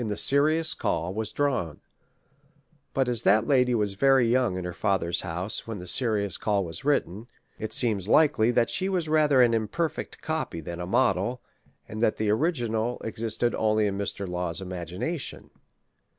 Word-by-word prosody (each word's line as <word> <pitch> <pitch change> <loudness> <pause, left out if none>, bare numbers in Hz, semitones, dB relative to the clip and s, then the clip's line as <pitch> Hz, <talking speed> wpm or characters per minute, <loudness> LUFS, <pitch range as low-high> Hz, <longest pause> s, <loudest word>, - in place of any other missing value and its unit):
LAW. - - -2
IX - - -3
the 105 - -3
Serious 155 +3 +3
CdW, 85 +3 -2
was 110 +1 -3
drawn; 125 - -1 1.1
but, 135 -1 0
as 120 -3 -1
that 110 0 +4
lady 125 -2 +3
was 105 -3 0
very 135 +3 +4
young 120 -5 +1
in 90 - -4
her 90 - -4
father's 90 -2 0
house 90 +8 -4
when 110 -2 -5
the 90 - -8
Serious 100 0 +1
Call 100 -3 0
was 80 -1 -7
written, 120 -7 -1 0.3
it 110 - -4
seems 105 -6 +1
likely 140 -4 +4
that 120 -1 +2
she 190 +1 -1
was 180 -4 -1
rather 150 -4 +4
an 120 -1 +3
imperfect 115 +9 -2
copy 155 - -3
than 85 +2 -7
a 90 - -4
model, 125 +2 +1 0.5
and 110 0 -6
that 110 - +2
the 105 -1 0
original 120 -4 -1
existed 115 +1 -2
only 110 -1 +1
in 100 -1 -1
Mr. 100 0 -3
Law's 90 -1 -3
imagination. 95 - -5
110 Hz, 175 wpm, -26 LUFS, 95-130 Hz, 1.1 s, that